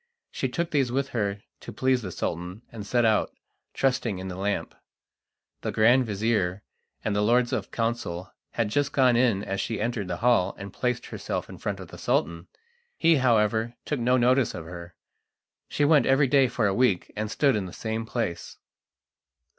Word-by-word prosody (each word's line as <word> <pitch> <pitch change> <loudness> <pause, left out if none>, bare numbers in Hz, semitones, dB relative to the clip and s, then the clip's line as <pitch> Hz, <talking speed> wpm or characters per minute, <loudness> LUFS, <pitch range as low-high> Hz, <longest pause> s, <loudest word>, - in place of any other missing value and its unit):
She - - -2
took 170 -1 -2
these 135 -5 +1
with 135 +2 -1
her 100 -3 -2 0.2
to - - -9
please 130 -1 +1
the 95 -4 -6
Sultan, 90 +6 -4
and 110 -3 -7
set 120 +1 +2
out, 110 -2 +2 0.4
trusting 125 -6 0
in 95 +1 -6
the 90 - -5
lamp. 100 +2 -2 0.9
The - - -2
grand 120 +3 +4
vizir 100 -3 0 0.4
and 105 - 0
the 105 - +2
lords 120 +4 +3
of 105 -6 -2
council 115 -7 -3 0.2
had 115 -3 0
just 145 +5 0
gone 130 -3 +4
in 115 -5 +2
as 95 0 -2
she 115 - -3
entered 110 -3 -2
the 90 -1 -3
hall 120 -4 +2
and 100 -1 -8
placed 125 -2 -1
herself - - -4
in - - -10
front - - -3
of - - -9
the - - -11
Sultan. 85 +1 -1 0.5
He, 165 -1 +4
however, 115 -2 +2
took 150 - -2
no 125 +2 +3
notice 125 0 +3
of 80 - -7
her. 85 0 -9 0.7
She 145 - +1
went 150 -1 +4
every 135 +1 +4
day 135 0 +4
for 120 -2 -1
a 100 - +2
week, 120 -6 +1
and 105 0 -3
stood 140 +3 +2
in 100 -3 -2
the - - -9
same 110 +3 -3
place. 115 -8 -3
115 Hz, 185 wpm, -26 LUFS, 100-125 Hz, 0.9 s, grand